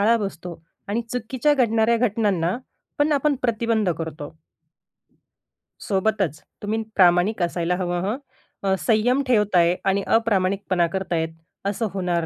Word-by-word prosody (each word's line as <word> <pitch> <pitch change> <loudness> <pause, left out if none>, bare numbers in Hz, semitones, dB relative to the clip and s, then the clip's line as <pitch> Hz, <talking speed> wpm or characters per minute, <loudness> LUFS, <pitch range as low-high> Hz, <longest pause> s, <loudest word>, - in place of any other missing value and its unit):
आळा 225 +3 +4
बसतो 180 -5 -5 0.3
आणि 220 +4 -1
चुकीच्या 255 +4 +1
घडणाऱ्या 230 -3 +3
घटनांना 195 -4 0 0.4
पण 295 +1 +3
आपण 290 +1 +2
प्रतिबंध 230 -4 +1
करतो. 160 -2 -6 1.5
सोबतच 195 -6 0 0.2
तुम्ही 215 +2 -1
प्रामाणिक 180 +3 +4
असायला 175 0 0
हवं 175 -1 -2
हं. 220 +5 -1 0.5
अ, 190 -1 +2
संयम 245 +4 +2
ठेवताय 195 -7 +3
आणि 195 +1 +2
अप्रामाणिकपणा 195 -5 +1
करताहेत 170 -3 -2 0.4
असं 210 +3 -1
होणार 180 -3 -1
200 Hz, 120 wpm, -23 LUFS, 175-225 Hz, 1.5 s, आळा